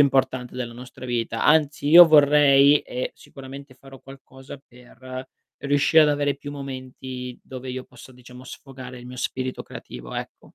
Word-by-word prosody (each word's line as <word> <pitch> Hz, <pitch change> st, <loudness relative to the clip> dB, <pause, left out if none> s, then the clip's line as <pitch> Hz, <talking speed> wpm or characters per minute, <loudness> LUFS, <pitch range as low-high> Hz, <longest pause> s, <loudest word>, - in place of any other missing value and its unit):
importante 130 Hz, -3 st, +1 dB
della 120 Hz, -2 st, -5 dB
nostra 125 Hz, +1 st, -12 dB
vita. 115 Hz, -2 st, -2 dB
Anzi, 150 Hz, -1 st, +2 dB
io 170 Hz, +2 st, +10 dB
vorrei, 145 Hz, -1 st, +6 dB
e 125 Hz, -, -5 dB
sicuramente 135 Hz, 0 st, -12 dB
farò 135 Hz, 0 st, -15 dB
qualcosa 135 Hz, 0 st, -13 dB
per 130 Hz, 0 st, -12 dB, 0.3 s
riuscire 145 Hz, +3 st, +3 dB
ad 150 Hz, -, +3 dB
avere 145 Hz, -1 st, 0 dB
più 145 Hz, 0 st, -9 dB
momenti, 130 Hz, -2 st, -8 dB
dove 130 Hz, 0 st, -9 dB
io 130 Hz, 0 st, -6 dB
posso, 125 Hz, +1 st, -15 dB
diciamo, 125 Hz, 0 st, -14 dB
sfogare 130 Hz, -1 st, -11 dB
il 120 Hz, -, -12 dB
mio 125 Hz, -, -10 dB
spirito 130 Hz, 0 st, -4 dB
creativo, -, -, -10 dB
ecco, -, -, -8 dB
130 Hz, 155 wpm, -23 LUFS, 125-140 Hz, 0.3 s, io